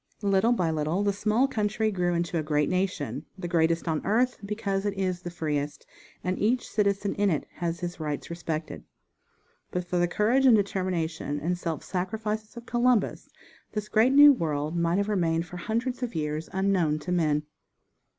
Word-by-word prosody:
Little 200 +3 +3
by 180 -9 +1
little 160 +5 0
the 200 -1 +2
small 215 +6 +2
country 215 -2 0
grew 175 -3 0
into 170 0 -1
a - - 0
great 150 -1 +1
nation, 160 - -2
the 180 -2 -4
greatest 165 0 +1
on 160 -2 0
earth, 245 +5 +1
because 200 -1 -2
it 205 -1 -1
is 185 -2 -1
the 175 - -5
freest, 150 -4 -3 0.4
and 185 +1 -1
each 235 +4 +1
citizen 200 -1 0
in 205 0 +3
it 155 -5 0
has 170 0 -2
his 175 0 -4
rights 150 +1 -4
respected. 165 -2 -4 0.9
But 180 -1 -3
for 175 0 -1
the 175 - +3
courage 235 +9 +3
and 240 - +8
determination 175 -7 -1
and 175 +4 -1
self 165 -4 -4
sacrifice 215 +4 -3
of 235 - -8
Columbus 240 -3 +1 0.4
this 210 -1 -3
great 220 +4 +4
new 290 +1 +9
world 155 - -2
might 170 +1 +1
have 200 0 +1
remained 170 -5 +1
for 180 - -9
hundreds 235 +7 -2
of 240 -6 -3
years 155 0 -2
unknown 190 -5 +1
to 155 +4 -6
men. 155 -4 +2
180 Hz, 180 wpm, -27 LUFS, 165-210 Hz, 0.9 s, new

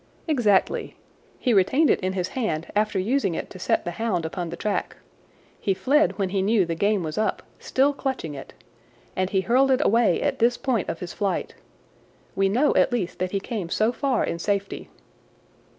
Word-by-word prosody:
"Exactly. 230 -11 +1 0.4
He 245 - +1
retained 260 +11 +4
it - - +2
in 185 -1 -2
his 185 -1 -2
hand 170 -11 -3
after 210 -1 +1
using 200 -2 0
it - - -5
to 185 - -10
set - - 0
the 175 - -2
hound 185 -4 -1
upon 170 +1 -4
the 170 - -5
track. 210 +2 -2 0.6
He 195 - 0
fled 295 +8 +2
when 195 -3 0
he 195 0 0
knew 205 -1 +3
the 165 - -2
game 200 +3 +1
was 155 +4 -3
up, 215 - -1 0.2
still 275 +2 +2
clutching 265 - -3
it. 135 -1 -9 0.6
And 185 0 0
he 190 -1 +1
hurled 255 +8 +3
it 265 +2 +2
away 225 -5 +3
at - - -1
this 240 +1 +3
point 240 -8 -1
of 165 - -4
his 175 -1 -6
flight. 200 -2 -2 0.8
We 195 0 +2
know 255 +9 +2
at - - +4
least 215 -8 -2
that 185 0 -1
he 195 - -1
came 200 -4 -5
so 215 +6 +2
far 260 -2 0
in 170 - -3
safety." 200 +2 -2
200 Hz, 195 wpm, -24 LUFS, 185-245 Hz, 0.8 s, retained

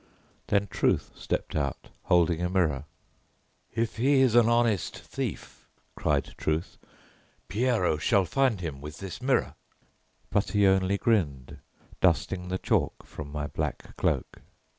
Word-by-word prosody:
Then 100 0 +2
Truth - - 0
stepped - - -3
out, 70 -4 -2 0.2
holding 85 -1 +3
a 90 - 0
mirror. 80 -7 +1 0.9
"If 115 0 -1
he 135 +3 +4
is 130 -4 +4
an 120 -1 +6
honest 115 -5 +1
thief," - - -6 0.3
cried - - 0
Truth, 80 +3 -2 0.7
"Pierrot 105 -8 +1
shall 100 -5 +3
find 125 -2 +1
him 75 -6 -5
with 75 +2 -8
this 95 +2 -7
mirror!" 130 +1 +1 0.8
but 100 - 0
he 105 -1 +4
only 95 +1 +3
grinned, 80 - 0 0.4
dusting 90 +1 +1
the 95 +1 -1
chalk - - 0
from 70 -1 -8
my 75 0 -3
black - - -4
cloak. - - -1
95 Hz, 135 wpm, -28 LUFS, 80-115 Hz, 0.9 s, an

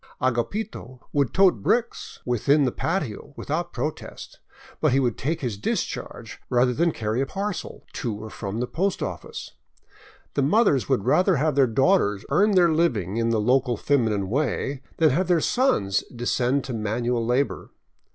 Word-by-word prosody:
Agapito 130 - -2
would 140 -4 +1
tote 185 - +4
bricks 235 - -1
within 140 +4 +2
the 125 - +1
patio 145 - -3
without 170 +4 -2
a - - -32
protest, 150 +5 -6 0.4
but - - +2
he 135 - +4
would 120 -4 +1
take 160 +5 -2
his 115 -7 -3
discharge - - -4
rather 125 0 +3
than 170 +6 +2
carry 110 -1 -2
a 135 - -1
parcel 200 0 -5
to 115 -5 -3
or 110 +1 -8
from 100 +2 -5
the 125 - 0
post 190 +9 -1
office. - - -6 0.8
The - - +1
mothers 140 - +3
would 100 - +1
rather 185 0 +3
have 155 +2 +1
their 135 -1 +4
daughters 115 - +2
earn 205 +8 +4
their 175 -3 +5
living 115 - 0
in 115 0 +1
the 115 -1 +1
local 125 +2 +2
feminine 110 -7 +1
way 135 +2 -1 0.2
than 160 -3 +4
have 175 +7 +1
their 175 -2 +3
sons 130 - +1
descend 125 +2 0
to 130 - -5
manual 115 +2 -1
labor. 125 +4 -1
130 Hz, 165 wpm, -24 LUFS, 115-160 Hz, 0.8 s, their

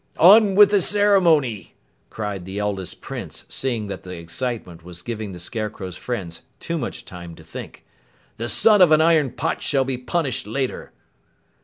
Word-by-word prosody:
"On 200 +2 +7
with 205 0 +7
the 205 -2 +4
ceremony!" 170 - +2 0.3
cried 105 -4 -5
the 95 +2 -7
eldest 100 -3 -3
Prince, - - -7
seeing 120 -5 -2
that 100 - -6
the 90 -1 -8
excitement 85 0 -5
was 90 0 -11
giving 110 -2 -5
the 90 - -9
Scarecrow's 100 -1 -5
friends 95 -9 -5 0.2
too 170 -1 -3
much 120 - -5
time 85 -2 -10
to - - -15
think. - - -10 0.5
"The 115 +1 -4
son 210 - +5
of 175 -3 +7
an 155 0 +6
iron 160 -4 +4
pot - - -3
shall 135 -2 +1
be 130 -2 -3
punished 130 - -2
later!" 130 +4 -3
120 Hz, 165 wpm, -22 LUFS, 95-160 Hz, 0.5 s, On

